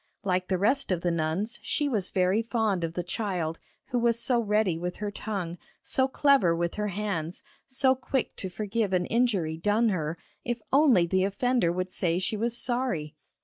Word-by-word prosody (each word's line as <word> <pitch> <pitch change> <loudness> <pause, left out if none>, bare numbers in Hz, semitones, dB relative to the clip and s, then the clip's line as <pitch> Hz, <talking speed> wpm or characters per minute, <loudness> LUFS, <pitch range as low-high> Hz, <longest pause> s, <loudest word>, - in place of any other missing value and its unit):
Like 185 -2 0
the 185 - +1
rest 245 +6 +2
of 175 -2 0
the 175 - +1
nuns 170 +8 -1
she 295 - 0
was 210 -9 0
very 185 +3 +2
fond 220 -6 0
of 165 0 -3
the 175 - -1
child 175 -4 -2 0.3
who 245 - -1
was 235 -1 +2
so 240 +1 +2
ready 210 -5 +1
with 180 +2 -4
her 210 -1 -3
tongue, 195 -5 -4 0.2
so 260 0 +2
clever 270 -11 +3
with 170 0 -1
her 210 0 -2
hands, 190 -5 -3 0.2
so 260 0 +3
quick 265 0 -2
to 190 - -4
forgive 210 +2 -2
an 180 -1 +2
injury 200 -10 +1
done 210 +7 +2
her, 165 -4 -2 0.3
if 240 0 -2
only 270 - +5
the 185 +2 +1
offender 200 -1 +1
would 185 +1 -3
say 170 -2 +1
she 185 +4 -1
was 235 +2 -1
sorry! 240 - -1
200 Hz, 190 wpm, -27 LUFS, 175-235 Hz, 0.3 s, only